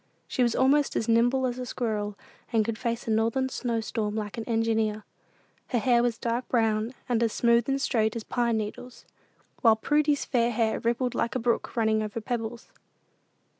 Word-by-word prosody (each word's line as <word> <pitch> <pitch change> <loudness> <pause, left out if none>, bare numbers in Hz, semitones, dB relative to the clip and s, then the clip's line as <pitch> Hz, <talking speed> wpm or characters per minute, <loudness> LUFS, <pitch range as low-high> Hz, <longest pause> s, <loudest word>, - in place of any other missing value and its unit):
She - - -2
was 240 -2 +2
almost 280 +2 +3
as 225 - -1
nimble 245 +3 +3
as 250 0 -2
a 250 - -4
squirrel, 210 -5 -2 0.3
and 225 -3 +2
could 230 0 -2
face 235 -2 -3
a - - 0
northern 230 +4 +1
snow 235 -3 -2
storm 215 -1 -3
like 210 -2 -4
an 230 - -4
engineer. 225 -2 0 0.6
Her 250 - 0
hair 240 0 +3
was 240 -1 0
dark 235 +2 -2
brown, 225 0 +1
and 235 -2 +1
as 230 -2 +2
smooth 235 +1 +3
and 270 0 +1
straight 220 -5 +1
as 230 - -4
pine 235 -1 0
needles; 220 +4 -6 0.6
while 225 -2 +6
Prudy's 295 +5 +1
fair 240 -2 +1
hair 225 -1 0
rippled 240 +1 0
like 235 - -1
a - - +1
brook 235 0 -1
running 220 -1 +2
over 215 +1 -4
pebbles. 230 0 -5
230 Hz, 185 wpm, -27 LUFS, 220-245 Hz, 0.6 s, while